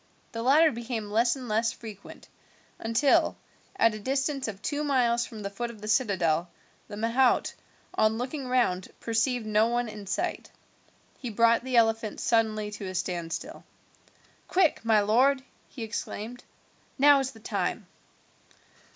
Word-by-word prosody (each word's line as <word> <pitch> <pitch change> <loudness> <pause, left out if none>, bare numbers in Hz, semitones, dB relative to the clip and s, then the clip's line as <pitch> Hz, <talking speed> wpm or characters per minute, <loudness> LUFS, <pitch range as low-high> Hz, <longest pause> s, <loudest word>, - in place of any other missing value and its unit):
The 230 - -4
latter 300 +6 +5
became 230 -3 -5
less 235 +4 +3
and 255 -2 -8
less 225 +1 +1
frequent, 215 -5 -11 0.5
until, 230 +5 +2 0.4
at 230 - +3
a 215 - -6
distance 270 +4 -1
of 200 -3 -6
two 290 +8 -2
miles 240 -4 +2
from 215 -2 -9
the 200 - -3
foot 240 +4 -4
of 230 -2 -11
the 210 - -8
citadel, 180 -7 +1 0.4
the 205 - -8
mahout, 235 +4 +2 0.4
on 215 +1 +2
looking 260 +3 -4
round, 240 -8 +1
perceived 230 +1 0
no 215 +1 +3
one 240 0 0
in 210 -2 -9
sight. - - -2 0.7
He 250 - -5
brought 230 +2 +3
the 255 -1 0
elephant 225 -1 +2
suddenly 215 -2 +1
to 210 -1 -7
a 185 - -6
standstill. 180 - -4 0.8
"Quick, 360 -9 +2
my 220 -2 +4
lord," 260 +6 +3 0.3
he 240 - -7
exclaimed, 225 +1 -5 0.5
"now 285 0 +6
is 270 -1 -1
the 225 - -14
time." 215 - -2
230 Hz, 150 wpm, -27 LUFS, 215-255 Hz, 0.8 s, now